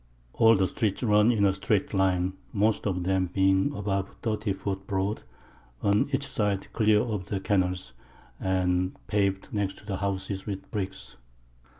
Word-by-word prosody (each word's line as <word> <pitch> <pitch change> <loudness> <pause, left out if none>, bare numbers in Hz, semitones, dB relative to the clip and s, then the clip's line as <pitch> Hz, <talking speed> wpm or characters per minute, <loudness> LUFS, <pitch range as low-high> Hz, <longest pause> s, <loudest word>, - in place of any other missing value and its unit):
All 115 -1 +6
the 95 -2 +2
Streets 105 +4 -1
run 105 0 +5
in 105 -4 +2
a 95 - +5
streight 95 +1 0
Line, 95 -1 +2 0.2
most 105 +1 +1
of 90 -3 -1
them 95 0 +1
being 95 +6 +2
above 100 -1 -2
30 110 -2 -1
Foot 95 0 -4
broad, 100 +2 -1 0.6
on 100 +5 +3
each 140 0 0
side 105 -6 -1
clear 105 -2 +4
of 105 -6 -3
the 100 - -2
Canals, 90 -8 0 0.5
and 90 -1 0
pav'd 100 -2 0
next 100 -1 -2
the 100 -2 -3
Houses 95 0 -3
with 100 -2 -6
Bricks. 95 - -5
100 Hz, 155 wpm, -27 LUFS, 95-105 Hz, 0.6 s, All